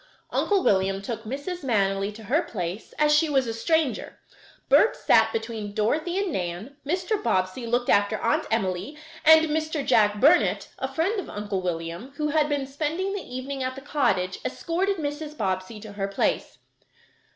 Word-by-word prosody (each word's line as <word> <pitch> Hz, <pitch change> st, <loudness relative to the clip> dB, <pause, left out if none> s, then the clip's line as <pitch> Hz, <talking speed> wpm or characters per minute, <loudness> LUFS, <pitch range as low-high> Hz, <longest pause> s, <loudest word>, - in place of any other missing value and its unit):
Uncle 400 Hz, -3 st, +1 dB
William 195 Hz, 0 st, +2 dB
took 220 Hz, +2 st, -6 dB
Mrs. 285 Hz, +9 st, -5 dB
Manily 200 Hz, -5 st, +1 dB
to 220 Hz, -, -11 dB
her 275 Hz, +10 st, +2 dB
place, 190 Hz, -, -5 dB
as 300 Hz, 0 st, +4 dB
she 305 Hz, +1 st, +4 dB
was 270 Hz, -3 st, +2 dB
a 230 Hz, -, -3 dB
stranger; 315 Hz, +4 st, 0 dB, 0.5 s
Bert 450 Hz, -, +5 dB
sat -, -, +4 dB
between 220 Hz, -, -4 dB
Dorothy 310 Hz, -, 0 dB
and 395 Hz, -2 st, 0 dB
Nan, 185 Hz, +6 st, -4 dB
Mr. 365 Hz, +7 st, -1 dB
Bobbsey 185 Hz, -, 0 dB
looked 245 Hz, +1 st, 0 dB
after 205 Hz, +2 st, +3 dB
Aunt -, -, 0 dB
Emily, 200 Hz, +5 st, -1 dB, 0.3 s
and 320 Hz, +1 st, +8 dB
Mr. 310 Hz, -1 st, -1 dB
Jack 210 Hz, -4 st, +4 dB
Burnet, 310 Hz, +8 st, +4 dB
a -, -, -3 dB
friend 385 Hz, +7 st, 0 dB
of -, -, -6 dB
Uncle 205 Hz, -2 st, -3 dB
William, 170 Hz, +7 st, -4 dB
who 300 Hz, +1 st, -1 dB
had 300 Hz, 0 st, +2 dB
been 285 Hz, -2 st, 0 dB
spending 315 Hz, +8 st, -2 dB
the 405 Hz, -, -3 dB
evening 265 Hz, +1 st, -5 dB
at 260 Hz, 0 st, -2 dB
the 270 Hz, -, -8 dB
cottage, 270 Hz, -11 st, 0 dB
escorted 375 Hz, +8 st, -1 dB
Mrs. 300 Hz, 0 st, -4 dB
Bobbsey 190 Hz, +2 st, -2 dB
to 215 Hz, -1 st, -9 dB
her 200 Hz, -1 st, -3 dB
place. 195 Hz, -, -1 dB
260 Hz, 170 wpm, -25 LUFS, 205-315 Hz, 0.5 s, and